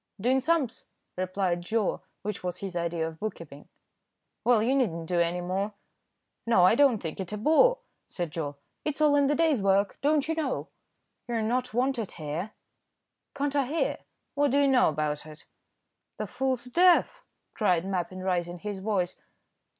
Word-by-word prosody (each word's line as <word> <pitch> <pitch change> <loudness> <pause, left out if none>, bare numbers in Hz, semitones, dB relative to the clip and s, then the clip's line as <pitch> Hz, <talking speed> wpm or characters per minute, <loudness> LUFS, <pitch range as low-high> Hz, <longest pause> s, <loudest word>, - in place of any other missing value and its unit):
"Doing 250 +6 +2
sums," 280 -3 0 0.3
replied 185 -1 -1
Joe, 210 +3 -1 0.2
which 210 -1 -4
was 180 -1 -3
his 190 -2 -6
idea 170 -1 -1
of 160 0 -9
book 215 0 -3
keeping. 145 -3 -12 0.7
"Well, 235 -3 +4
you 250 +4 +2
need 255 -6 +3
not 165 0 -6
do 175 +1 0
any 170 +1 +1
more." 195 +4 -2 0.7
"No, 205 -6 +5
I 185 - +6
don't 270 -2 +4
think 165 -4 -6
it 190 -1 -4
a - - -2
bore," 320 - +4 0.3
said 175 -4 -4
Joe. 150 -4 -4 0.3
"It's 300 -1 -2
all 300 -1 +4
in 285 -1 +4
the 295 - +2
day's 315 -7 +2
work, 195 0 +2
don't 295 0 +2
you 325 - 0
know?" 310 -5 -2 0.6
"You're 230 -2 -1
not 245 +1 -1
wanted 245 -4 0
here." 160 +6 -5 0.8
"Can't 285 0 -1
I 275 -3 +2
hear? 320 +5 -1 0.3
what 285 0 +2
do 280 +2 +3
you 280 - +4
know 260 -2 +4
about 150 0 -2
it?" 155 0 -12 0.7
"The - - -3
fool's 260 -2 -1
deaf," 360 - +3 0.3
cried 180 -5 +1
Mappin, 185 -1 -3
raising 175 -2 -1
his 205 +2 -5
voice. 190 -3 -1
210 Hz, 175 wpm, -28 LUFS, 175-270 Hz, 0.8 s, I